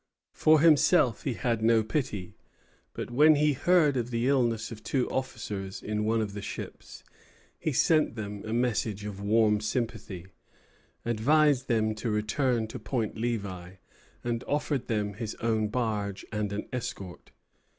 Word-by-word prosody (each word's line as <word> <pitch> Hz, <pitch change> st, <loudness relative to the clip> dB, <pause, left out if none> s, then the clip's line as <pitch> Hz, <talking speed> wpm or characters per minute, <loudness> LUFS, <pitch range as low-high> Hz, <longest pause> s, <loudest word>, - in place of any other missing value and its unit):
For 155 Hz, -1 st, +4 dB
himself 150 Hz, -, +4 dB
he 130 Hz, -5 st, -1 dB
had 120 Hz, -3 st, -1 dB
no 110 Hz, 0 st, +4 dB
pity; 110 Hz, -, -3 dB, 0.6 s
but -, -, -5 dB
when 150 Hz, +5 st, +6 dB
he 150 Hz, 0 st, +3 dB
heard 160 Hz, 0 st, +3 dB
of 120 Hz, -1 st, -1 dB
the 120 Hz, +1 st, 0 dB
illness 120 Hz, -5 st, +1 dB
of 110 Hz, -1 st, -8 dB
two 125 Hz, +4 st, 0 dB
officers 105 Hz, -7 st, -4 dB
in 105 Hz, 0 st, -2 dB
one 110 Hz, +1 st, +2 dB
of 105 Hz, -2 st, -3 dB
the 105 Hz, -, -5 dB
ships, -, -, -8 dB, 0.6 s
he 155 Hz, -, -1 dB
sent 155 Hz, -1 st, +3 dB
them 105 Hz, -2 st, -5 dB
a 110 Hz, -, -5 dB
message 110 Hz, -4 st, -1 dB
of 100 Hz, -1 st, -6 dB
warm 105 Hz, 0 st, +3 dB
sympathy, 105 Hz, -5 st, -3 dB, 0.8 s
advised 130 Hz, +4 st, +3 dB
them 110 Hz, -2 st, +1 dB
to 110 Hz, +2 st, -4 dB
return 110 Hz, +3 st, 0 dB
to -, -, -7 dB
Point 115 Hz, -6 st, -2 dB
Levi, 100 Hz, -6 st, -3 dB, 0.5 s
and 120 Hz, 0 st, -2 dB
offered 145 Hz, -3 st, -1 dB
them 105 Hz, -3 st, -1 dB
his 110 Hz, +2 st, -5 dB
own 110 Hz, -2 st, 0 dB
barge 105 Hz, -4 st, -2 dB
and 105 Hz, -2 st, -2 dB
an 100 Hz, +1 st, -4 dB
escort. 100 Hz, -7 st, -6 dB
115 Hz, 150 wpm, -28 LUFS, 105-130 Hz, 0.8 s, when